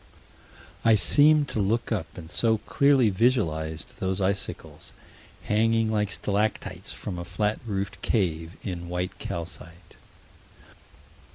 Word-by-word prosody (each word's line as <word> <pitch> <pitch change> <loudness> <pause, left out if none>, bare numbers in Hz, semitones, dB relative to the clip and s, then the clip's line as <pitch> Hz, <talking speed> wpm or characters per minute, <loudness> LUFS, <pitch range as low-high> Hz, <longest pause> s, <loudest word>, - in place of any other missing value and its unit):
I 115 -1 +6
seemed 145 +7 +5
to - - -2
look 115 +5 0
up 95 -8 -1
and 85 -1 -9
so 110 +4 +2
clearly 135 +1 +3
visualized 80 - 0
those 95 +1 -1
icicles 95 +1 -3 0.5
hanging 115 +1 +2
like 105 -2 +1
stalactites 105 +2 -2
from 90 -4 -6
a - - -4
flat 105 +4 -1
roofed 100 -2 -3
cave, 85 -5 -1
in 85 -3 -5
white 90 +1 -3
calcite. 85 0 -7
100 Hz, 115 wpm, -26 LUFS, 90-110 Hz, 0.5 s, I